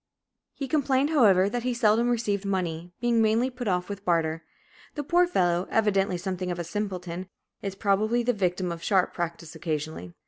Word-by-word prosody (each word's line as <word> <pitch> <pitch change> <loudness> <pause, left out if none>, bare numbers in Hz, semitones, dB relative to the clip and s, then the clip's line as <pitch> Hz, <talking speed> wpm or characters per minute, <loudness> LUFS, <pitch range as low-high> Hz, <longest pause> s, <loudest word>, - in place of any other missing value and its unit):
He 275 - -4
complained, 275 0 +1
however, 200 - +5
that 240 +4 -2
he 250 0 -1
seldom 230 0 +3
received 215 -4 0
money, 175 -3 -2
being 235 -1 +2
mainly 225 +4 +2
put 245 -2 -6
off 180 -2 0
with 200 -1 -6
barter. 165 -3 0 0.5
The 295 - -3
poor 350 +4 +3
fellow, 175 - +1
evidently 195 -4 +2
something 185 0 -3
of 175 - -2
a 175 - -3
simpleton, 185 -1 -4 0.3
is 195 -1 -4
probably 215 +4 +1
the 245 +1 +2
victim 180 -3 -1
of 170 -1 -6
sharp 190 0 +2
practice 170 -2 -4
occasionally. 155 - -4
195 Hz, 175 wpm, -27 LUFS, 175-235 Hz, 0.5 s, however